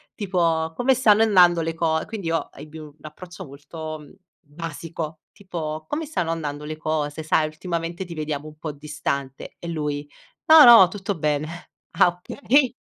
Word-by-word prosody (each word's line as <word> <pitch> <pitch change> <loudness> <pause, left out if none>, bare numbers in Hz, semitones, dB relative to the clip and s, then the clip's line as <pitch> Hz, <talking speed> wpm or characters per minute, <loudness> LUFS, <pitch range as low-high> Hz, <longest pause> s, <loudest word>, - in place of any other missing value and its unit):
tipo: 165 -5 0
"Come 260 +1 +2
stanno 220 -4 +4
andando 180 -6 +5
le 165 0 -3
co" 160 -1 0
quindi 210 -6 -6
io 165 -2 -2
ebbi 155 +2 -11
un 150 -1 -12
approccio 175 +4 -10
molto, 155 +3 -8
mhmm, 145 - -15 0.3
basico, 160 0 -7
tipo: 160 -6 -6
"Come 305 0 -3
stanno 175 - -2
andando 150 -3 -4
le 155 0 -6
cose? 155 -1 -2
Sai, 155 0 +1
ultimamente 170 +2 -4
ti 170 -2 -9
vediamo 150 -1 -4
un 155 0 -13
po' 155 -1 -5
distante" 140 -2 -5
e 170 - -8
lui: 150 -3 -4 0.4
"No, 315 -1 +9
no, 230 -6 +9
tutto 195 +1 -4
bene". 150 -1 -1 0.5
"Ah, - - +7
okay." 250 +9 +1
160 Hz, 165 wpm, -23 LUFS, 150-180 Hz, 0.5 s, No